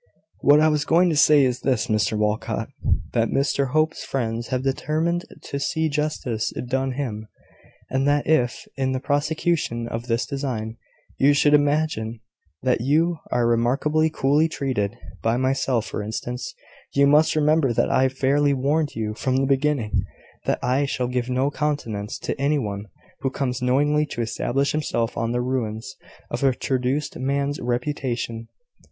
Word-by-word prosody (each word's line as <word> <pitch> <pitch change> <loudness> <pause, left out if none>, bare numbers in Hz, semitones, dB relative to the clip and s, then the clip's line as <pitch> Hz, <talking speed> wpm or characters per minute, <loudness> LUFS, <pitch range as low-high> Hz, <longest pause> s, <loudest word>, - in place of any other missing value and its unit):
"What 145 +1 +6
I 155 - +5
was 150 -2 +2
going 170 +3 +3
to - - 0
say 150 -1 +6
is 125 -1 +1
this, 125 -4 +1
Mr 110 -1 +1
Walcot, 105 0 -1 0.4
that - - +2
Mr 140 0 +1
Hope's 155 +3 +1
friends 115 -3 -2
have 130 0 -2
determined 160 +5 0 0.2
to 140 - -4
see 160 +3 0
justice 140 -7 -2 0.2
done 130 +1 0
him; 110 -6 -4 0.6
and 135 +1 0
that 145 0 +2
if, 125 -6 +1
in 130 -1 0
the 130 - -1
prosecution 145 -3 0
of 115 +1 -5
this 115 0 0
design, 125 -6 -4 0.4
you 140 +2 +5
should 145 +1 +4
imagine 145 -6 +1 0.4
that 125 -2 +2
you 160 +6 +2
are 120 - +1
remarkably 135 +7 +2
coolly 150 +2 +2
treated, 130 -10 -2 0.2
by 115 +1 +1
myself, 130 -3 +1
for - - -4
instance, 120 +4 -5 0.4
you 140 0 +5
must 150 +3 +4
remember 155 -3 +3
that 115 - +1
I 130 0 +3
fairly 140 +2 +2
warned 145 +3 0
you 110 -1 -2
from 130 +3 -1
the 135 - +2
beginning 135 -4 +1 0.6
that - - +2
I 130 +3 +2
shall 125 -2 -2
give 125 0 -2
no 130 +3 +1
countenance 120 -9 -2
to - - -3
any 145 +2 +2
one 100 -5 -3 0.3
who 135 - -1
comes 130 -2 -2
knowingly 145 +4 +2
to 120 - -4
establish 135 +4 0
himself 125 -6 -1
on 115 0 -1
the 120 0 0
ruins 120 -4 -3 0.4
of 120 - -2
a 135 -2 +3
traduced 130 +3 -1
man's 140 +2 -1
reputation. 120 -2 -2
135 Hz, 160 wpm, -23 LUFS, 120-145 Hz, 0.6 s, What